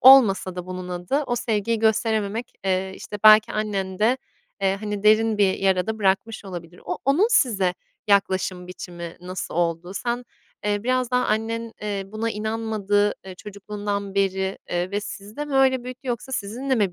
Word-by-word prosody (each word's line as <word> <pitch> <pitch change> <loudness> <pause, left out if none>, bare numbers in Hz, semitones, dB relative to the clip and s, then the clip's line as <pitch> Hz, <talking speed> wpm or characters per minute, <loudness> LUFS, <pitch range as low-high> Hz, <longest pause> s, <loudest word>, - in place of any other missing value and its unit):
olmasa 215 -8 +7
da 180 0 -5
bunun 185 0 -6
adı, 180 +11 -1
o 240 - 0
sevgiyi 230 -2 0
gösterememek, 220 +1 +1
eee, 190 0 0
işte, 210 - -7
belki 215 0 +8
annende, 210 +3 0 0.4
eee, 195 0 +2
hani, 210 -1 -3
derin 215 0 +4
bir 195 -2 +4
yara 190 0 +2
da 220 0 -2
bırakmış 205 +3 0
olabilir. 175 -2 -8
O - - -3
onun 320 - +4
size 200 - +3 0.3
yaklaşım 190 -2 +2
biçimi 175 -2 -7
nasıl 185 -1 -5
oldu? 170 +1 0
Sen, 240 +3 -2 0.4
eee, 205 0 0
biraz 255 0 +1
daha 250 0 +2
annen, 225 +1 -1
eee, 200 -2 -2
buna 220 +3 -3
inanmadı, 210 -2 0
eee, 185 - -7
çocukluğundan 200 0 -5
beri, 190 -1 0
eee, 175 +2 -1
ve 205 - -1
sizi 205 +1 -8
de 295 - -2
mi 290 -2 -5
öyle 260 -2 +4
büyüttü 255 +1 -8
yoksa 245 +2 -3
sizinle 245 +6 -1
mi 200 -6 +1
205 Hz, 165 wpm, -24 LUFS, 190-230 Hz, 0.4 s, belki